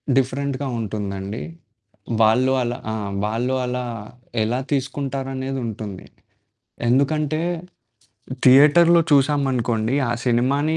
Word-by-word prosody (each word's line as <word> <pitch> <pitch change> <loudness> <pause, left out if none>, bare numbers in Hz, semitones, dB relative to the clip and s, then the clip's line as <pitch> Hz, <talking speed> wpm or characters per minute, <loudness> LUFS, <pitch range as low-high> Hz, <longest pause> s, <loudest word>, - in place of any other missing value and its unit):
డిఫరెంట్‌గా 135 +1 -1
ఉంటుందండి. 100 -1 -4 0.8
వాళ్ళు 125 +4 +4
అలా 120 0 -2 0.2
ఆ! - - -2 0.3
వాళ్ళు 120 +5 -1
అలా 125 0 -2 0.6
ఎలా 120 +4 -1
తీసుకుంటారనేదుంటుంది. 135 -6 -3 0.8
ఎందుకంటే 150 +4 +1 1.0
థియేటర్‌లో 150 +6 +7
చూసామనుకోండి. 130 -5 +1
ఆ - - 0
సినిమాని 135 +6 +1
130 Hz, 80 wpm, -22 LUFS, 115-140 Hz, 1.0 s, థియేటర్‌లో